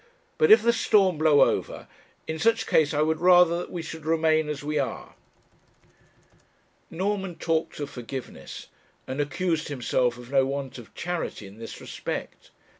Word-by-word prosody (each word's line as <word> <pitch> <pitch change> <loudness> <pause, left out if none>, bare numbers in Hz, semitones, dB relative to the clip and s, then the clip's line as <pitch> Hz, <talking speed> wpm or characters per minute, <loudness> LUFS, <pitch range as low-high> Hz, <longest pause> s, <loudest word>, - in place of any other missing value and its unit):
But 465 - +4
if 435 - +8
the 235 - +4
storm 195 -7 +3
blow 155 -2 +5
over, - - 0 0.4
in 160 0 -4
such 225 +2 +2
case 155 -2 +3
I 150 0 +1
would 160 0 0
rather 175 -1 +5
that - - -6
we 170 -2 -5
should 160 0 -8
remain 160 -1 +2
as 145 -1 -4
we 150 0 -1
are.' 135 - -4 1.8
Norman 190 +1 -2
talked 160 -2 -2
of 145 -1 -5
forgiveness, 125 +1 -8 0.4
and 135 +3 -3
accused 165 +2 -1
himself 125 -3 0
of 125 +1 -12
no 135 -1 +4
want 135 -1 -4
of 115 - -14
charity 175 - -4
in 100 +3 -13
this 115 - -8
respect. - - -6
155 Hz, 160 wpm, -26 LUFS, 140-175 Hz, 1.8 s, if